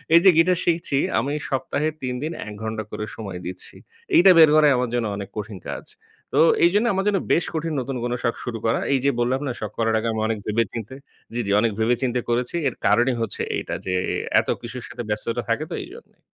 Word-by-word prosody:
এই - - +10
যে - - +10
গিটার 180 +2 +4
শিখছি, 165 -5 +1 0.2
আমি 140 +2 -2 0.2
সপ্তাহে 135 +3 -1
৩ 125 -1 -2
দিন 155 - -2 0.2
১ 105 - -6
ঘণ্টা 110 0 -3
করে 105 - -4
সময় 95 -5 -6
দিচ্ছি। 90 +1 -7 0.4
এইটা 190 +2 +8
বের 160 - +9
করাই 150 -2 +6
আমার 125 -1 0
জন্য 120 -2 0
অনেক 100 -1 -6
কঠিন 105 -1 -5
কাজ। - - -5 0.5
তো - - +3 0.3
এইজন্য 205 +6 +3
আমার 195 +1 -1
জন্য 200 -2 +2
বেশ 170 - +2
কঠিন 160 0 -2
নতুন 130 +1 -4
কোনো 120 0 -1
শখ 120 -2 +1
শুরু 120 -2 -3
করা। 115 - +2
এই 135 - +3
যে 140 - +5
বললাম 125 +3 +1
না, - - -1
শখ 105 -3 -4
করার 115 -1 +2
আগে 115 - -2
আমি 110 - -2
অনেক 110 -1 -2
ভেবে 110 +2 +2
চিন্তে 115 +2 -6 0.4
জ্বি, 120 - -1
জি - - 0
অনেক 115 0 +2
ভেবে 115 +2 +3
চিন্তে 125 -1 +1
করেছি। 120 +5 0
এর 130 - -2
কারণই 120 +5 +3
হচ্ছে 115 - -3 0.2
এইটা, - - -4
যে 95 - -1 0.2
এ - - -1 0.2
এত - - -3
কিছুর 120 +1 -7
সাথে 120 - -6
ব্যস্ততা 115 +3 -1
থাকে 115 +6 +1
তো - - -2
এইজন্যেই। 445 +7 -14
120 Hz, 230 wpm, -23 LUFS, 110-150 Hz, 0.5 s, এই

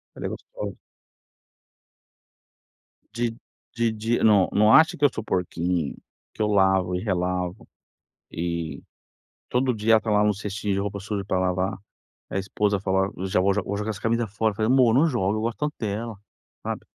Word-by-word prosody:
Ela - - -5
é - - -1
gostosa. - - -7 2.4
Di 115 -1 -1 0.4
di 115 -1 +2
di 115 +2 0
não 105 -4 +5
não 105 +1 +5
acha 160 +1 +6
que 145 - 0
eu 145 - +6
sou 110 - -5
porquinho, 90 -4 -1 0.4
que - - -18
eu - - +3
lavo 95 -3 +3
e 90 - -1
relavo, 90 -2 -2 0.6
e, 85 -1 -3 0.7
todo 125 +1 +1
dia 110 0 +2
ela 110 - +5
tá 110 - -2
lá 105 0 +4
no 105 0 +3
cestinho 105 0 -3
de 95 - 0
roupa 100 0 -3
suja 100 0 -3
para 95 -1 0
lavar. 95 +1 0 0.5
A - - -1
esposa 100 +1 0
fala: 95 0 +1 0.2
"Já 95 - +1
vou 100 +1 +3
jo 105 - 0
vou 100 +2 -3
jogar 105 +2 -2
essa 105 -2 -6
camisa 115 +1 +1
fora", 110 +2 0
eu - - -14
falei: 110 +2 +1
"Amor, 125 -4 +5
não 145 +6 +5
joga, 110 - 0
eu 110 - -2
gosto 115 0 -2
tanto 150 0 -2
dela", 110 +1 -3 0.5
sabe. - - -4
105 Hz, 185 wpm, -25 LUFS, 95-115 Hz, 2.4 s, acha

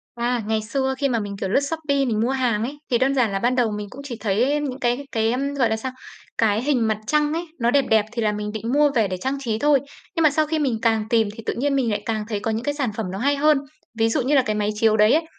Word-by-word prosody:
À, 240 0 -1
ngày 220 0 0
xưa 265 +4 -1
khi 280 - +1
mà 240 -3 0
mình, 205 -2 -4
kiểu, 195 - -3
lướt 205 - +3
Shopee 280 -1 -1
mình 225 -4 0
mua 235 +3 +1
hàng 245 -5 0
ấy, 280 +4 -5
thì 240 - +3
đơn 270 +2 +2
giản 250 -5 +2
là 195 - 0
ban 245 +5 +1
đầu 245 -3 +2
mình 210 0 -4
cũng 275 - -10
chỉ 255 -4 -6
thấy 230 +8 +1
những 270 -3 -4
cái 245 +3 0
cái, 225 0 +1
ừm, 275 +3 -2
gọi 255 -5 +2
là 220 - +1
sao? 255 +4 -5 0.5
Cái 220 0 +2
hình 255 -5 +1
mặt 215 -1 0
trăng 300 +3 +2
ấy, 335 +2 -2 0.2
nó 235 +1 +3
đẹp 280 +1 +3
đẹp 220 -1 +4
thì 235 - -2
là 210 -1 +2
mình 210 0 -4
định 220 +2 -4
mua 295 +1 +4
về 225 -5 +2
để 185 - -3
trang 265 +5 -2
trí 225 -5 -2
thôi. 290 +2 +4 0.4
Nhưng 330 - +2
mà 310 - +6
sau 310 +2 +1
khi 315 +1 -1
mình 265 -7 0
càng 225 -2 +2
tìm 225 -3 +3
thì 225 - -9
tự - - -1
nhiên 280 +3 0
mình 250 -4 +1
lại 205 -1 -2
càng 215 -2 -1
thấy 210 -3 -2
có 225 - -2
những 220 +2 -2
cái 290 0 -1
sản 275 -6 -1
phẩm 225 - -2
nó 195 - -4
hay 280 +4 +1
hơn. 300 0 +4 0.4
Ví 225 0 +3
dụ 260 +4 0
như 270 +4 +1
là 270 - +5
cái 215 -4 -2
máy 210 0 0
chiếu 215 0 +3
đấy 215 +1 +5
ấy, 320 +1 +2
240 Hz, 310 wpm, -22 LUFS, 220-280 Hz, 0.5 s, mà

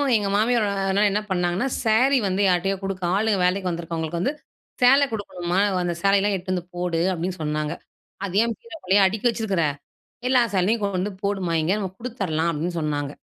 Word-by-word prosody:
எங்க 205 -2 +1
மாமியார் 220 0 +2 0.2
அதனால 200 +2 +3
என்ன 210 +2 0
பண்ணாங்கன்னா, 180 +6 0 0.2
சேரி 250 +5 +4
வந்து 190 +1 0
யார்ட்டயோ 190 +2 +1
கொடுக்க 195 -1 -4
ஆளுங்க 210 -1 +1
வேலைக்கு 185 0 0
வந்துருக்கவங்களுக்கு 165 0 -3
வந்து 275 - 0 0.5
சேலை 270 +3 +6
கொடுக்கணும்மா, 185 -4 -2 0.2
அந்த 175 - -1
சேலையெல்லாம் 200 +1 +3
எடுத்து 185 0 -3
வந்து 180 -2 -3
போடு, 175 -2 -1
அப்படின்னு 180 +1 -4
சொன்னாங்க. 150 0 -2 0.5
அது 195 -1 -5
ஏன் 230 -1 -2
பீரோக்குள்ளயே 250 - 0
அடுக்கி 215 +5 +1
வச்சிருக்கிற. 215 -7 -1 0.7
எல்லா 255 -1 +5
சேலையும் 205 +4 +1
கொண்டு 195 0 -1
போடுமா 195 -4 -1
இங்க. 175 - +1
நம்ம 190 -3 -3
கொடுத்துரலாம் 190 -10 -2
அப்படின்னு 165 +3 -3
சொன்னாங்க. 145 -2 -2
190 Hz, 165 wpm, -23 LUFS, 175-215 Hz, 0.7 s, சேலை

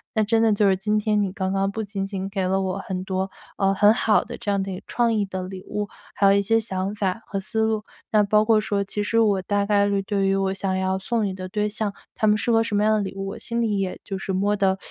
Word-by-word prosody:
那 220 - +3
真 225 +2 +2
的 220 -1 +4
就 205 0 +3
是 190 - +2
今 210 +2 +1
天 210 0 +1
你 195 - -2
刚 190 0 -2
刚 195 0 0
不 220 - -3
仅 200 -2 -3
仅 195 -1 -4
给 195 -2 -1
了 190 +1 +1
我 190 0 -2
很 190 -2 -4
多， 190 0 -2 0.3
呃， 195 -1 +2
很 205 +2 +5
好 220 -1 +3
的 - - -8
这 205 - -2
样 200 -1 +1
的 195 0 -4
有 185 - -5
创 240 -1 +1
意 215 -2 +1
的 190 -1 -5
礼 185 0 -7
物， 210 0 -3 0.3
还 200 - +3
有 195 - +6
一 200 - +4
些 225 +3 +2
想 195 -3 -2
法 205 -1 -1
和 195 - -3
思 220 +3 -2
路。 220 -1 +1 0.3
那 215 - +5
包 210 +1 +3
括 220 -1 +4
说 205 -1 0
其 200 +1 -3
实 230 +2 +1
我 205 -4 +3
大 200 +2 0
概 200 0 +3
率 200 -1 0
对 195 -1 0
于 195 - +2
我 195 -1 0
想 195 -1 -1
要 190 0 0
送 220 +1 0
与 190 - -3
的 185 0 -7
对 210 +2 0
象， 210 0 -2 0.2
他 215 - 0
们 210 0 +4
适 235 - 0
合 225 -1 +4
什 225 -2 -2
么 205 - +2
样 215 0 +4
的 - - 0
礼 195 -1 -5
物， 195 0 -4
我 195 - -7
心 235 0 -3
里 215 -4 +1
也 190 -1 -3
就 195 - -5
是 195 - -3
摸 200 +2 +1
得， 190 -2 +2
200 Hz, 315 characters per minute, -24 LUFS, 195-215 Hz, 0.3 s, 有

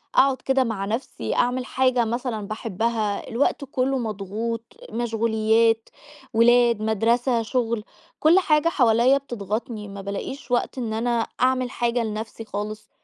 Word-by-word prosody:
أقعد 265 -1 +5
كده 265 -1 +2
مع 210 -4 -3
نفسي 225 +6 -3
أعمل 250 +1 +1
حاجة 255 -3 +2
مثلًا 225 -3 -3
باحبها، 215 -1 -2
الوقت 275 +4 0
كله 265 +1 +1
مضغوط، 220 +1 -3 0.3
مشغوليَّات، 225 0 +1 0.4
ولاد، 235 0 +5
مدرسة، 230 +3 +2
شغل، 230 -2 -1 0.4
كل 330 +5 +6
حاجة 305 -2 +3
حواليّا 245 -2 +4
بتضغطني، 220 -3 -4
ما 200 0 -8
بالاقيش 200 +7 -6
وقت 245 +2 0
إن 225 -3 -2
أنا 235 0 0
أعمل 255 -1 +2
حاجة 240 0 0
لنفسي 220 +1 -5
خالص 215 +1 -5
230 Hz, 130 wpm, -24 LUFS, 220-250 Hz, 0.4 s, كل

